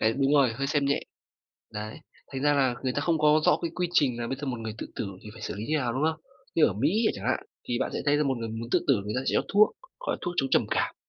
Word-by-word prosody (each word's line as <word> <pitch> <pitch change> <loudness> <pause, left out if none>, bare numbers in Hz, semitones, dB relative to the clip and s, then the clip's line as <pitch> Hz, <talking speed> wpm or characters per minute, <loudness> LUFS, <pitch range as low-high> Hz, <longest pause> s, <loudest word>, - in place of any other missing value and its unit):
Đấy, 110 +1 +3
đúng 135 +2 +1
rồi, 135 -5 +5
hơi 135 +5 -2
xem 145 -1 +1
nhẹ, 140 +1 +1 0.7
đấy. 105 +3 -5 0.3
Thành 135 - -4
ra 145 +1 +4
là 135 -3 +2
người 130 - 0
ta 145 - -1
không 165 +1 +2
có 150 0 +5
rõ 150 - +5
cái 170 -1 -2
quy 180 -1 0
trình 125 -7 +3
là 115 - -2
bây 135 - -2
giờ 145 - -3
một 125 -2 -2
người 110 -1 -5
tự - - -5
tử - - -2 0.2
thì 105 - -8
phải 110 - -12
xử 95 - -4
lý 105 +2 -5
như 155 - +2
nào, 125 -5 -1
đúng 130 - -1
không? 160 0 -11 0.3
Như 160 - +6
ở 95 - +1
Mỹ 160 - +1
chẳng 100 - -7
hạn, 130 - +2 0.3
thì 120 0 -1
bạn - - -1
sẽ - - -2
thấy 145 0 +4
là 150 - +2
một 135 -3 0
người 115 -1 -4
muốn 115 +1 -5
tự - - +4
tử 135 - +6
người 105 - -3
ta 130 - 0
sẽ - - +1
cho - - +4
thuốc, 210 +1 +7 0.3
gọi - - -2
là - - -12
thuốc 175 - -3
chống 135 -1 +1
trầm - - +3
cảm, - - 0
135 Hz, 320 wpm, -27 LUFS, 115-150 Hz, 0.7 s, thuốc